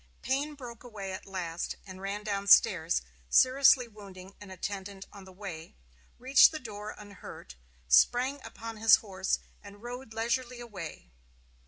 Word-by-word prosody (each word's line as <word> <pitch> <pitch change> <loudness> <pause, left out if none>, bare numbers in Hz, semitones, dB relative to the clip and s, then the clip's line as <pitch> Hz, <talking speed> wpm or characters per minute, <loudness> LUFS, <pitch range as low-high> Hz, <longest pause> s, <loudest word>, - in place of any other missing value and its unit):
Payne 285 +3 -1
broke 245 -4 -10
away 205 -5 -7
at 190 - -8
last, 175 -3 -4
and 185 -1 -10
ran 200 +2 -4
down 200 -1 -3
stairs, 180 -7 +5 0.3
seriously 260 - +5
wounding 195 -3 -12
an 205 - -10
attendant 195 +1 -6
on 200 -2 -12
the 190 - -13
way, 180 -4 -9 0.4
reached 260 +2 +6
the 315 - -4
door 215 -5 -8
unhurt, 200 - -11 0.3
sprang 245 - +3
upon 225 0 -8
his 220 +1 +7
horse, 190 -3 -2 0.2
and 205 +1 -14
rode 245 0 -8
leisurely 240 +2 -2
away. 190 - -9
205 Hz, 145 wpm, -30 LUFS, 190-240 Hz, 0.4 s, his